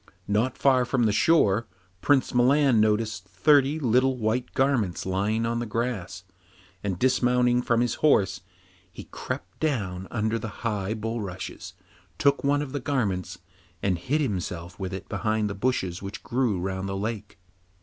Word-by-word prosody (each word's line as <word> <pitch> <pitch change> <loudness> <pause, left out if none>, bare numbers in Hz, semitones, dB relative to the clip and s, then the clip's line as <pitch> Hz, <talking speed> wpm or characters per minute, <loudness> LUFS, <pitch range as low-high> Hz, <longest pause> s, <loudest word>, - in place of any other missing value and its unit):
Not 115 +6 0
far 130 -2 +4
from 125 0 0
the 110 - +3
shore 115 -4 +3 0.3
Prince 145 -3 +2
Milan 130 0 +4
noticed 110 -2 +1
thirty 140 - +3
little 130 -1 +2
white 115 +2 -1
garments 125 -10 +1
lying 100 +4 0
on 115 0 -1
the 120 - -3
grass, 105 -5 -3 0.6
and 95 -3 -2
dismounting 125 0 +2
from 120 -1 +1
his 120 -2 +1
horse, 100 -10 +3 0.5
he - - -9
crept 90 +2 -7
down 100 - -2
under 110 0 -1
the 110 +1 -8
high 105 -1 -1
bulrushes, 100 -5 -5 0.4
took 140 +6 +2
one 145 +1 +2
of 140 - -7
the 145 - -2
garments 110 - -2 0.5
and 90 -3 +1
hid 145 - 0
himself 90 - -4
with 95 -1 -4
it 95 0 -6
behind 110 -1 -1
the 100 - -3
bushes 100 -5 -1
which 100 +1 -7
grew 120 -6 0
round 95 +1 -3
the 95 - -3
lake. 105 0 -5
110 Hz, 155 wpm, -26 LUFS, 95-130 Hz, 0.6 s, far